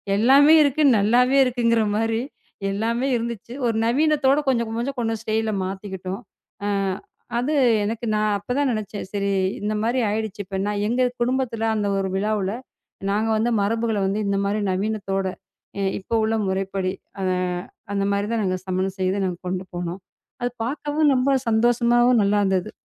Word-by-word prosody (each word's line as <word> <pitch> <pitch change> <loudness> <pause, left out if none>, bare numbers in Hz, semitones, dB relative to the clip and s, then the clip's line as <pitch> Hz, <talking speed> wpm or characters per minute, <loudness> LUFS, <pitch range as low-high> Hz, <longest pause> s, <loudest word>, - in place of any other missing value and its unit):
எல்லாமே 275 +8 +6
இருக்கு, 285 +1 +1 0.2
நல்லாவே 250 +6 +3
இருக்குங்கிற 230 -3 +2
மாதிரி 225 +1 0 0.5
எல்லாமே 230 +5 -1
இருந்துச்சு. 235 -1 -4
ஒரு 230 - 0
நவீனத்தோட 285 +1 +3
கொஞ்சம், 235 -3 +1
கொஞ்சம், 260 +3 -3
கொஞ்சம் 225 -1 -1
ஸ்டைல் 220 0 0
ல - - -1
மாத்திக்கிட்டோம். 190 +1 -5 0.4
அ - - 0 0.7
அது 255 +6 0 0.3
எனக்கு 225 +3 -3
நான் 210 0 +1
அப்போ 205 +4 -8
தான் 285 -1 +2
நினைத்தேன். 215 -2 -4
சரி 200 -1 -1 0.3
இந்த 210 +1 -1
மாதிரி 235 +4 +1
ஆகிவிட்டது. 215 -1 -3
இப்போ 190 +1 -5
நான் 205 0 -1
எங்கள் 250 +2 +2
குடும்பத்தில் 245 -2 0
அந்த 205 -1 0
ஒரு 190 -1 -1
விழாவில் 205 -1 0 0.6
நாங்கள் 220 +2 +1
வந்து 235 +2 +1
மரபுகளை 225 0 0
வந்து 195 +2 0
இந்த 200 0 +1
மாதிரி 205 +2 0
நவீனத்தோட, 195 -1 -1 0.5
அ - - -1 0.2
இப்ப 190 - -21
உள்ள 220 +1 +1
முறைப்படி, 190 0 -1 0.3
அ - - -2 0.7
அந்த 200 0 0
மாதிரி 200 +1 -1
தான் 225 - 0
நாங்கள் 185 -1 -2
சமையல் 185 +1 -1
செய்து 190 +1 0
நாங்கள் 180 -2 -4
கொண்டு 185 +1 -3
போனோம். 175 +1 -4 0.4
அது 245 0 -1
பார்க்கவும் 295 +3 +1
ரொம்ப 255 +2 +2 0.2
சந்தோஷமாகவும் 240 +1 +4
நல்லாயிருந்தது. 200 -2 +1
220 Hz, 155 wpm, -23 LUFS, 200-240 Hz, 0.7 s, எல்லாமே